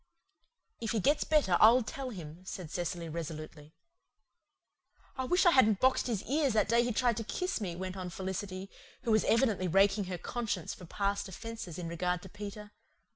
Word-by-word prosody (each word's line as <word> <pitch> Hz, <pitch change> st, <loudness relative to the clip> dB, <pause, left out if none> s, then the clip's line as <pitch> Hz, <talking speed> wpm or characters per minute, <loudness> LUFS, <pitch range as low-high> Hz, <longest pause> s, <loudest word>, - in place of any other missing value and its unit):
"If 225 Hz, -1 st, -2 dB
he 225 Hz, -, +1 dB
gets 290 Hz, +9 st, +3 dB
better 285 Hz, -, +3 dB
I'll 235 Hz, +3 st, +7 dB
tell 265 Hz, +4 st, -5 dB
him," 170 Hz, -5 st, -9 dB
said 185 Hz, -4 st, -7 dB
Cecily 175 Hz, -1 st, -3 dB
resolutely. 155 Hz, -1 st, -7 dB, 1.4 s
"I 260 Hz, -, -2 dB
wish 360 Hz, +8 st, +3 dB
I 350 Hz, -, +8 dB
hadn't 220 Hz, -, +5 dB
boxed 260 Hz, 0 st, +3 dB
his 225 Hz, -4 st, -1 dB
ears 280 Hz, -2 st, +1 dB
that 215 Hz, -, +3 dB
day 235 Hz, +1 st, +4 dB
he 245 Hz, -, 0 dB
tried 235 Hz, 0 st, +1 dB
to 225 Hz, -, -2 dB
kiss 365 Hz, -, -2 dB
me," 180 Hz, -4 st, -3 dB
went 185 Hz, +1 st, -5 dB
on 185 Hz, -1 st, -5 dB
Felicity, 190 Hz, +1 st, -5 dB, 0.3 s
who 235 Hz, -, 0 dB
was 215 Hz, -, +4 dB
evidently 220 Hz, -6 st, +2 dB
raking 195 Hz, +3 st, +3 dB
her 180 Hz, -1 st, -4 dB
conscience 210 Hz, -3 st, -3 dB
for 180 Hz, -, -11 dB
past 200 Hz, +3 st, -1 dB
offences 225 Hz, -4 st, -7 dB
in 175 Hz, -2 st, -4 dB
regard 180 Hz, +1 st, -1 dB
to 190 Hz, -, -10 dB
Peter. 205 Hz, +1 st, -8 dB
200 Hz, 180 wpm, -32 LUFS, 180-235 Hz, 1.4 s, I